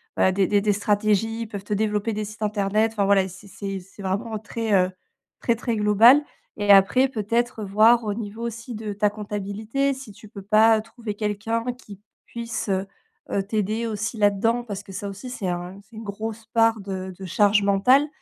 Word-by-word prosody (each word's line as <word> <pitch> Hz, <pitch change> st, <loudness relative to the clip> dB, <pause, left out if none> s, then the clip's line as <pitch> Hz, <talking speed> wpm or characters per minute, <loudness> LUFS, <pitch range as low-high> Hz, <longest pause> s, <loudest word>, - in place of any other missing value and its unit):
bah, 190 Hz, -, +3 dB
des 190 Hz, +1 st, +2 dB
des 205 Hz, +1 st, +2 dB
des 205 Hz, 0 st, +2 dB
stratégies. 210 Hz, +2 st, +1 dB
Ils 230 Hz, -, -4 dB
peuvent 200 Hz, -2 st, -7 dB
te 205 Hz, -, -3 dB
développer 210 Hz, +1 st, 0 dB
des 210 Hz, 0 st, -3 dB
sites 215 Hz, +2 st, -8 dB
internet, 210 Hz, +1 st, +1 dB
enfin 205 Hz, -3 st, +1 dB
voilà, 195 Hz, -1 st, +3 dB
c'est 190 Hz, +2 st, -13 dB
c'est 195 Hz, 0 st, -5 dB
c'est 195 Hz, +2 st, -13 dB
vraiment 210 Hz, +4 st, -2 dB
très, 220 Hz, +1 st, -3 dB
heu 185 Hz, -1 st, +3 dB, 0.5 s
très 235 Hz, -, +2 dB
très 235 Hz, 0 st, -2 dB
global. 220 Hz, +7 st, +6 dB, 0.3 s
Et 205 Hz, -1 st, +3 dB
après, 205 Hz, +7 st, +5 dB
peut-être, 230 Hz, 0 st, -1 dB
voir 220 Hz, +4 st, +4 dB
au 210 Hz, -2 st, -1 dB
niveau 215 Hz, 0 st, -6 dB
aussi 235 Hz, +1 st, -5 dB
de 215 Hz, -1 st, -5 dB
ta 205 Hz, +1 st, +2 dB
comptabilité, 210 Hz, +6 st, -2 dB
si 265 Hz, -4 st, -10 dB
tu 210 Hz, +2 st, -14 dB
peux 200 Hz, -1 st, -10 dB
pas 215 Hz, +2 st, +4 dB
trouver 225 Hz, -1 st, -7 dB
quelqu'un 215 Hz, +2 st, -2 dB
qui 205 Hz, -5 st, -14 dB, 0.2 s
puisse, 230 Hz, -2 st, -5 dB
heu 190 Hz, 0 st, 0 dB, 0.5 s
heu, 200 Hz, -, 0 dB
t'aider 215 Hz, +2 st, -1 dB
aussi 220 Hz, +1 st, -3 dB
là-dedans, 215 Hz, +3 st, +2 dB
parce 200 Hz, -3 st, -6 dB
que 195 Hz, -, -12 dB
ça 200 Hz, +2 st, -5 dB
aussi, 200 Hz, +6 st, -8 dB
c'est 220 Hz, -6 st, -4 dB
un 180 Hz, +2 st, -4 dB
c'est 210 Hz, +3 st, -19 dB
une 220 Hz, -, -7 dB
grosse 220 Hz, +2 st, -6 dB
part 225 Hz, 0 st, +3 dB
de 190 Hz, -1 st, -5 dB
de 195 Hz, -, -8 dB
charge 205 Hz, +3 st, +3 dB
mentale 225 Hz, +9 st, +4 dB
210 Hz, 200 wpm, -24 LUFS, 200-225 Hz, 0.5 s, global